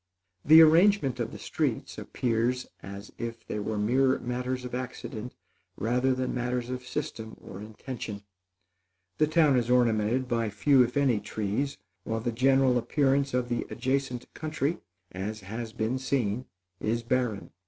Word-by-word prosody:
The 160 +2 +9
arrangement 160 -3 +4
of - - -2
the - - -8
streets - - -2
appears 120 +1 0 0.2
as 100 +1 -9
if 115 -1 -5
they 105 - -3
were 105 +1 -2
mere 130 +5 +3
matters 125 +1 -3
of 125 - -7
accident 125 -2 -5 0.4
rather 125 +4 +1
than 130 0 -2
matters 125 0 -2
of 125 0 -5
system 110 -1 -5
or 95 - -10
intention. 110 -1 -7 1.0
The 155 - +4
town 155 -3 +4
is 120 -1 0
ornamented 120 0 +2
by 115 -3 0
few, 125 +7 +4
if 125 +2 +1
any, 130 -6 +3
trees, 105 +6 -2 0.3
while 110 +2 -2
the 120 +2 -2
general 130 +1 +3
appearance 135 +1 +1
of 125 -1 0
the 120 -1 -2
adjacent 130 -1 -1
country, 155 +1 -2 0.3
as 105 +3 -5
has 110 +4 -6
been 110 +4 -1
seen, 125 -3 -1 0.3
is 115 +2 -1
barren. 120 -4 -1
125 Hz, 150 wpm, -28 LUFS, 110-130 Hz, 1.0 s, The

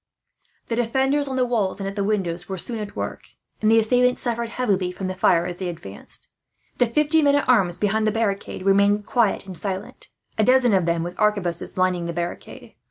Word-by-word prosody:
The 230 - 0
defenders 265 +5 +1
on 265 - -3
the 255 -1 +2
walls 215 -6 -1
and 195 - -3
at 195 - -5
the 200 - -1
windows 185 -4 -2
were 190 - -3
soon 230 +5 -4
at 210 -1 -6
work, - - -4 0.4
and 215 - +3
the 225 - +5
assailants 250 +3 +2
suffered 235 -1 -2
heavily 200 -8 0
from 190 +1 -6
the 185 - -2
fire, 180 -2 +3
as 175 0 -5
they 185 - -4
advanced. 100 - -8 0.5
The 245 - +4
fifty 300 +6 +3
men 285 -1 +4
at 285 - +1
arms 190 -9 +3
behind 215 +1 +1
the - - +3
barricade 200 -4 -2
remained 200 +1 +3
quiet 225 -5 +1
and 190 -2 -8
silent, 195 +2 -5 0.3
a - - +5
dozen 250 -1 +4
of 185 -3 +2
them 170 -1 +1
with 175 +1 -7
arquebuses 200 -7 0
lining 180 -2 +1
the 170 - -3
barricade. 175 +1 -6
205 Hz, 210 wpm, -23 LUFS, 185-235 Hz, 0.5 s, the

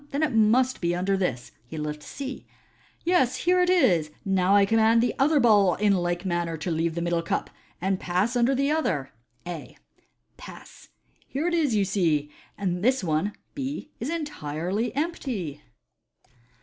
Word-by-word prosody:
Then 285 +3 -1
it 300 - +1
must 230 +3 +3
be 170 0 +1
under 190 +2 0
this." 135 -11 -2 0.2
He 160 - -8
lifts 150 0 -5
C. 275 -1 -7 0.3
" - - -34
Yes, 330 -9 +2
bere 360 +1 +4
it 360 - +2
is. 175 - +3 0.2
Now 190 0 +3
I 200 -1 +6
com 225 +3 +1
mand 225 +1 +5
the 235 +1 +1
other 295 +2 +4
ball 205 -7 +5
in 205 0 +2
like 175 0 -1
manner 175 -2 -1
to 165 +3 -3
leave 165 0 -1
the 170 - -2
middle 170 -1 0
cup, 165 - -2 0.3
and 190 +1 0
pas9 185 +6 0
tinder 245 +2 +2
the 275 +2 +1
other 160 - -1 0.3
(A). 175 -4 -7 0.6
Pass! - - -13 0.4
Here 290 +6 -2
it 350 - 0
is, 300 -9 +2
you 200 -2 +2
see, 160 -7 0 0.3
and 180 -2 -2
this 255 -1 +2
one 165 +5 0 0.2
(B) 280 +1 -5
is 245 - -3
entirely 210 - -3
empty." 265 - -3
200 Hz, 175 wpm, -26 LUFS, 175-265 Hz, 0.6 s, I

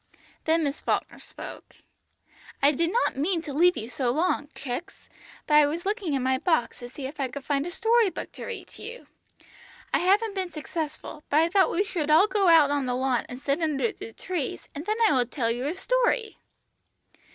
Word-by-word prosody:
Then 320 +1 +3
Miss 285 0 -2
Falkner - - -1
spoke. - - -10 0.8
"I 285 - +5
did 335 +4 0
not 475 - +1
mean 335 +5 +1
to 290 - -6
leave 350 +4 +4
you 220 - -4
so 250 +1 -2
long, 295 +2 0
chicks, 275 +9 -6 0.4
but 300 - -1
I 300 -1 +7
was 330 +5 -4
looking 395 - -1
in 265 - -1
my 260 0 +1
box 320 -6 0
to 245 - -8
see 265 +2 -8
if 290 +3 -7
I 270 - 0
could 270 +2 -8
find 285 +1 0
a - - -3
story 450 +3 +3
book 345 - -7
to - - -8
read - - -6
to - - -14
you. 485 +2 -8 0.9
I - - +4
haven't 405 +4 +2
been 380 -2 -2
successful, 305 -1 -6
but 290 - +2
I 330 - +2
thought 380 +1 +4
we 395 +4 +1
would 305 -3 0
all 315 +6 +7
go 405 -2 +1
out 320 -4 +6
on 285 -2 0
the 250 0 -1
lawn 255 -1 0
and 250 - -7
sit 280 +3 -1
under 280 -7 +1
the 225 - -9
trees, 355 -8 -4
and 295 +6 -7
then 430 +1 0
I - - +3
would 245 -2 +1
tell 230 -5 0
you 245 +4 -2
a 320 - -2
story!" 480 +1 0
305 Hz, 215 wpm, -26 LUFS, 275-370 Hz, 0.9 s, I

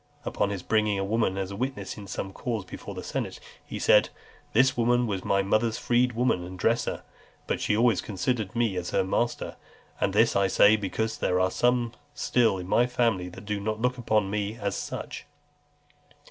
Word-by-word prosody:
Upon 100 - 0
his 100 -3 -4
bringing 105 -2 +2
a 95 - -1
woman 105 -2 0
as 95 0 -3
a - - -5
witness 130 +5 -3
in 105 -2 -9
some 95 +1 -5
cause 115 -4 -3
before - - -8
the - - -6
senate, - - -4 0.2
he - - -7
said, - - +5 0.4
"This 130 +3 +4
woman 120 +1 +2
was 100 -4 -3
my 100 0 +2
mother's 110 +3 +1
freedwoman 120 -5 +1
and 90 +1 -8
dresser, 115 +5 0 0.4
but - - -2
she 105 - +1
always 115 -5 +3
considered 110 +1 -2
me 115 -5 +1
as 90 -1 -3
her - - +1
master; 115 +5 -1 0.4
and - - +1
this - - +3
I 100 -1 +3
say, 105 +3 +6
because 110 +2 -2
there 90 - +1
are 95 0 +2
some 120 -1 +1 0.2
still 115 -6 +2
in 90 -1 -6
my 120 +5 +3
family 115 -7 0
that 95 +3 -11
do 105 0 -2
not 110 +2 -2
look 125 +2 0
upon 110 -4 +1
me 105 +1 -2
as 100 -3 -2
such." - - -6
105 Hz, 190 wpm, -27 LUFS, 95-120 Hz, 0.4 s, say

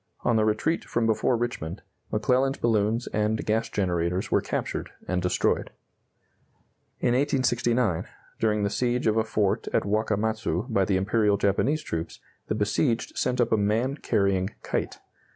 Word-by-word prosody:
On 120 - +2
the 110 - +3
retreat 110 +10 0
from 115 -1 -1
before 115 +2 +2
Richmond, 115 -9 -4 0.3
McClellan's 130 +5 +2
balloons 115 +1 +1
and 105 +1 0
gas 110 +2 0
generators 90 -1 -1
were - - +3
captured - - -3 0.2
and 90 0 0
destroyed. 90 0 +1 1.3
In - - +2
1869, 125 - +1 0.3
during 105 -2 +1
the 100 - 0
siege 125 +1 0
of 110 0 +2
a 110 - +3
fort 105 -3 0
at - - +2
Wakamatzu 110 -2 0
by 100 -5 +2
the 95 0 +1
Imperial 105 +1 +2
Japanese 125 +10 +1
troops, 80 - -4 0.3
the - - -1
besieged 115 +4 0
sent 125 0 0
up 120 - +2
a 110 - +4
man 110 +6 +1
carrying 100 -7 +1
kite. - - -2
110 Hz, 150 wpm, -26 LUFS, 100-120 Hz, 1.3 s, a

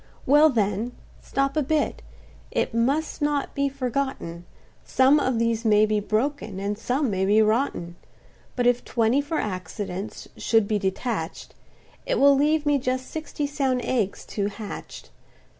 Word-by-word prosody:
"Well 295 +3 +6
then—stop 240 +4 -2
a 305 - +2
bit,—it 300 -4 -3
must 275 +8 0
not 290 -1 0
be 280 -1 0
forgotten, 255 -10 -3 0.4
Some 265 +3 +4
of 255 -4 0
these 230 0 0
may 215 -1 +5
be 215 0 +1
broken, 215 -1 -2
and 200 +1 -2
some 250 +4 -1
may 190 -1 0
be 205 +3 +4
rotten; 215 -6 0 0.6
But 245 - 0
if 245 0 +3
twenty 235 +4 +2
for 310 +3 -3
accidents 190 - -5
should 225 -3 +2
be 210 -1 0
detach'd, 190 -2 -3 0.5
It - - +1
will 280 0 +7
leave 300 +2 +2
me 290 -1 +3
just 255 0 -2
sixty 310 -2 -4
sound 275 -3 0
eggs 220 -6 -1
to 200 -1 -1
hatch'd. 205 0 -8
245 Hz, 140 wpm, -25 LUFS, 210-280 Hz, 0.6 s, will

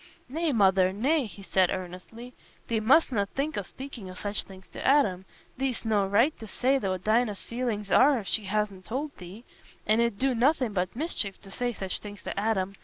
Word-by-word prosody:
"Nay, 320 +5 -1
Mother, 190 -5 +4
nay," 265 +7 +1
he 200 -1 -11
said, 185 -1 +2
earnestly, 185 +7 -7 0.3
"thee 230 -1 0
mustna 225 -3 +3
think 285 +8 -3
o' - - -1
speaking 240 -1 -9
o' 185 - -9
such 205 +1 -3
things 190 -1 -13
to - - -8
Adam. 230 -10 +3 0.3
Thee'st 260 -3 -2
no 210 -3 +2
right 230 +10 +3
to 220 - -8
say 260 +6 +1
what 185 -5 -2
Dinah's 215 -2 +1
feelings 230 -4 -3
are 280 0 +6
if 215 - -5
she 215 - -1
hasna 205 -1 -1
told 270 - -4
thee, 190 +7 -11 0.4
and 220 +2 +3
it 235 -1 +2
'ud - - -21
do 265 +2 +1
nothing 250 -1 +2
but 185 0 -1
mischief 235 - -2
to 195 - -13
say 245 +4 -1
such 190 -4 -5
things 205 -2 -10
to - - -4
Adam. 200 -2 0
215 Hz, 200 wpm, -28 LUFS, 195-255 Hz, 0.4 s, are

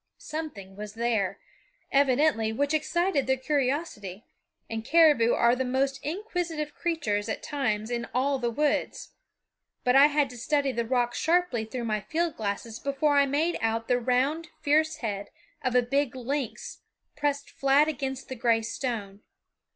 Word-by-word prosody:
Something 285 -12 -7
was 210 +1 -8
there, 225 -5 0 0.5
evidently, 275 -4 +3
which 285 +6 0
excited 310 -1 +1
their 265 0 +2
curiosity, 260 - -2 0.4
and 225 -1 -4
caribou 295 -5 +5
are 235 +1 +4
the 260 - -1
most 270 +2 0
inquisitive 335 -4 -3
creatures, 235 -12 -1
at - - -3
times, 220 -6 -2
in 235 -1 -2
all 270 +2 +1
the 240 -1 0
woods, 295 +5 -1 0.7
but 250 +1 +3
I 275 +2 +9
had 290 -3 +1
to 245 - -10
study 280 +2 +1
the 235 -2 -2
rock 245 -1 +1
sharply 330 -10 +1
through 240 +2 -5
my 215 -2 0
field 330 - -1
glasses 215 +1 -4
before 280 +1 +1
I 280 0 +5
made 310 +5 0
out 225 0 -1
the 245 0 +2
round 265 +7 +1
fierce 310 +2 +2
head 205 -8 -4 0.3
of 255 -1 0
a 250 - +5
big 275 +1 0
lynx 260 +1 -4 0.4
pressed 285 -1 -1
flat 275 +2 +3
against 270 -3 -3
the - - -5
gray 230 -2 +2
stone. 220 -4 -4
265 Hz, 155 wpm, -27 LUFS, 230-295 Hz, 0.7 s, I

